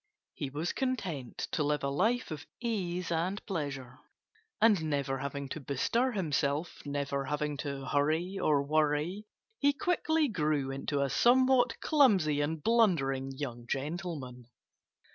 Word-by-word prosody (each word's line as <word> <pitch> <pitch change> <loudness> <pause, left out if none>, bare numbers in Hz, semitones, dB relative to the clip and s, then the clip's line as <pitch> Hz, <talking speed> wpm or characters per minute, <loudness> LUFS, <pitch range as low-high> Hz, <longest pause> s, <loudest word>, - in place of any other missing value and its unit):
He 140 - -4
was 150 +5 -2
content 190 - -3
to - - 0
live 150 -1 0
a 140 - +1
life 220 - +1
of 155 0 -6
ease 180 -7 -2
and 175 +5 -1
pleasure. 140 - -4 0.6
And 210 -7 +4
never 140 -3 -1
having 140 +1 -4
to 155 - -4
bestir 230 - 0
himself 150 -4 -1
never 140 -1 -2
having 150 +1 -2
to 140 -1 -4
hurry 160 +8 0
or 145 -2 +3
worry 155 +7 0 0.3
he 285 0 +4
quickly 320 -2 +1
grew 150 - 0
into 140 +1 -1
a 140 - 0
somewhat 250 - +4
clumsy 195 - +4
and 150 +1 -2
blundering 145 - +2
young 120 -4 -5
gentleman. 135 -4 -4
155 Hz, 135 wpm, -31 LUFS, 140-200 Hz, 0.6 s, And